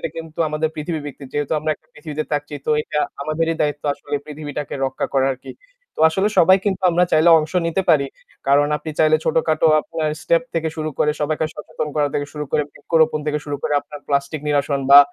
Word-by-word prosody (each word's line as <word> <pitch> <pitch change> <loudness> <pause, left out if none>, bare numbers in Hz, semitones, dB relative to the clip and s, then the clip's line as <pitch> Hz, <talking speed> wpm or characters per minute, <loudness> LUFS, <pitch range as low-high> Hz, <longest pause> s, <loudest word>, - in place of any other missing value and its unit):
এটা - - -2
কিন্তু 160 -1 -8
আমাদের 150 +1 0
পৃথিবীভিত্তিক। 150 -3 -5
যেহেতু 145 0 -2
আমরা 155 +1 -1
একটা 155 - -29
পৃথিবীতে 155 0 -5
থাকছি 145 0 -2
তো - - +1
এটা 150 - -2 0.2
আমাদেরই 165 +2 0
দায়িত্ব 150 -1 -1
আসলে 145 +1 -6
পৃথিবীটাকে 150 -1 -6
রক্ষা 135 - -2
করা 135 -1 +3
আরকি। 130 - -10 0.4
তো - - -5
আসলে 190 +5 +1
সবাই 185 +2 +7
কিন্তু 195 -3 -1
আমরা 175 +1 +3
চাইলে 160 +2 +5
অংশ 155 0 -3
নিতে 170 +3 0
পারি। 145 -4 +4 0.4
কারণ 145 +1 +5
আপনি 150 +2 -6
চাইলে 155 0 +5
ছোটখাটো 160 0 +2
আপনার 155 0 -3
step 170 -1 +2
থেকে 165 -1 0
শুরু 155 0 -2
করে 150 - +3
সবাইকে 155 +1 0
সচেতন 150 0 -5
করা 145 -1 +2
থেকে 145 - -1
শুরু 150 -1 -4
করে 150 - +3
বৃক্ষরোপণ 160 -2 +1
থেকে 150 0 0
শুরু 145 -1 -3
করে - - -1
আপনার 145 0 -11
প্লাস্টিক 140 +2 -1
নিরসন 145 -1 +1
বা 140 - +11
155 Hz, 200 wpm, -21 LUFS, 145-160 Hz, 0.4 s, বা